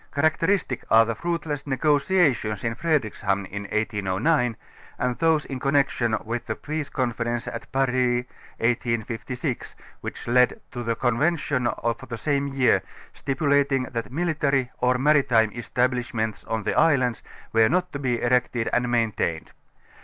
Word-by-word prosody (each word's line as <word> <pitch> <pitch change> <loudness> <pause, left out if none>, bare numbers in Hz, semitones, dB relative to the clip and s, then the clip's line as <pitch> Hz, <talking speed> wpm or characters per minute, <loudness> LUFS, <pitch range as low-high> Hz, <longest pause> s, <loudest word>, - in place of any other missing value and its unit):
Characteristic 160 -1 +1
are 115 0 +6
the 115 - -1
fruitless 155 +1 -3
negotiations 145 - +2
in 115 -1 0
Fredrikshamn 110 -9 0
in 100 +2 -6
1809 110 - 0 0.4
and 125 -1 -1
those 160 -2 +3
in 135 -2 -5
connection 135 -5 +1
with 115 +2 -4
the 110 - -2
peace 155 -1 -4
conference 120 -2 -2
at 115 - -7
Paris 125 -2 +1 0.3
1856, 120 +2 -2 0.3
which - - -7
led 125 +1 +4
11 - - -17
to 120 -2 -5
a - - 0
convention 135 +2 0
oIl 115 0 -2
the 115 - -4
same 140 +1 0
year, 135 -2 +3 0.3
stipulating 140 -1 +1
that 115 0 -4
military, 140 -5 0
or 125 0 +2
maritime 125 -6 +3
establishments 120 -2 -1
on 110 -1 -2
the - - 0
islands 130 -7 +3 0.3
were 110 0 +5
not 180 +1 0
to 140 - -4
be 125 -4 0
erected 120 -1 +1
and 125 0 +1
maintained. 110 -9 -1
125 Hz, 140 wpm, -25 LUFS, 115-140 Hz, 0.4 s, are